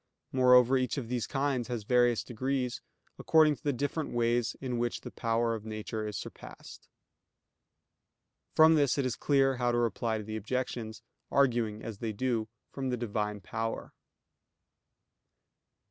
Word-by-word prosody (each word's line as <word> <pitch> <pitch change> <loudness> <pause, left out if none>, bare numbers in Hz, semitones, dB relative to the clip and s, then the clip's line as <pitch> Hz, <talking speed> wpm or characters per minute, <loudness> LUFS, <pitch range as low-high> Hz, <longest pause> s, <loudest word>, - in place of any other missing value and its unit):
Moreover, 125 0 +5
each 130 +3 -1
of 120 -5 -4
these 125 -2 -1
kinds 135 -4 -1
has 120 -4 -4
various 120 +1 +3
degrees, 130 +1 -2 0.4
according 155 -2 +4
to - - -27
the 145 - +1
different 145 +4 -2
ways 120 +1 +1
in 125 -3 -3
which 120 0 -1
the - - -8
power 115 0 0
of 110 -2 -5
nature 110 0 -4
is 105 - -4
surpassed. - - -10 1.7
From 160 +1 +7
this 145 -4 +3
is 130 -4 0
clear 135 -2 +2
how 120 -1 +1
to 120 - 0
reply 115 -1 0
to 105 - -5
the 110 +1 -5
objections, 115 0 -4 0.3
arguing 120 -6 +1
as 110 -3 -7
they 110 -2 -3
do 115 -1 -1 0.2
from 135 -1 -3
the 125 - -1
Divine 105 -3 -2
power. 115 +4 -4
120 Hz, 145 wpm, -30 LUFS, 110-130 Hz, 1.7 s, From